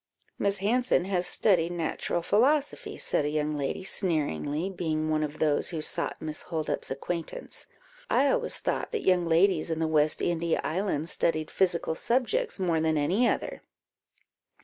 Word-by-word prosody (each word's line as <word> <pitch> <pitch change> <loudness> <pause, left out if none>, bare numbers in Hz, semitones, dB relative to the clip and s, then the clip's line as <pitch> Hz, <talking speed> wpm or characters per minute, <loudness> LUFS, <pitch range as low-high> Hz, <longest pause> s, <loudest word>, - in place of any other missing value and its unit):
"Miss 200 0 +2
Hanson 215 -2 +1
has 180 -2 0
studied 175 -4 +2
natural 170 0 -2
philosophy," 280 - +1
said - - +1
a 145 - 0
young 150 0 -1
lady, 145 +6 -3
sneeringly, 155 - 0
being 155 -4 -2
one 155 0 +1
of 150 0 -3
those 150 -2 +1
who 165 - -4
sought 155 - 0
Miss 155 -1 -5
Holdup's 160 -3 -3
acquaintance. 165 +5 -4 0.4
"I 275 +2 +3
always - - 0
thought - - -2
that 450 - -2
young 180 -2 +4
ladies 170 0 +3
in 160 - -1
the 160 0 0
West 155 -1 +2
India 170 -1 0
islands 170 -2 -1
studied 155 -2 0
physical 175 -4 +1
subjects 255 - 0
more 170 -4 +1
than 160 -1 +1
any 185 +12 +2
other." - - -3
170 Hz, 155 wpm, -28 LUFS, 155-195 Hz, 0.4 s, young